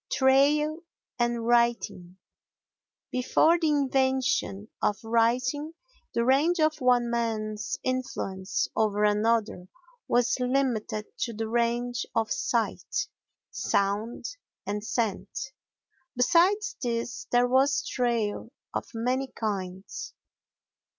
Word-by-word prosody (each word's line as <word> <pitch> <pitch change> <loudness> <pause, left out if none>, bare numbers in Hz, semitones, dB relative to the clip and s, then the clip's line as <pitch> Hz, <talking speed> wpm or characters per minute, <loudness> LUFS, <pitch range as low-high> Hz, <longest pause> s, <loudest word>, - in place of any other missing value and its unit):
Trail 285 +3 +3 0.4
and 240 -1 0
Writing 235 -7 +1 0.9
Before 315 +7 +3
the 325 - +1
invention 260 -7 +1
of 205 - +1
writing 255 +7 +1 0.4
the 235 - +2
range 300 +7 +3
of 310 -1 +2
one 245 -2 +3
man's 215 -3 -2
influence 205 -7 -2
over 210 -1 +1
another 210 -3 +1 0.4
was 245 +1 +2
limited 250 -5 0
to 235 - -2
the 225 +1 -3
range 240 +1 0
of 225 -1 0
sight, 425 0 -1 0.4
sound 200 +3 -1 0.4
and 205 +1 -3
scent; 230 +3 -2 0.6
besides 360 - +3
this 235 -1 -3
there 245 0 +4
was 270 +3 +2
trail, 235 -3 -1 0.2
of - - -3
many 255 +4 0
kinds. 195 -5 -5
240 Hz, 95 wpm, -27 LUFS, 220-265 Hz, 0.9 s, there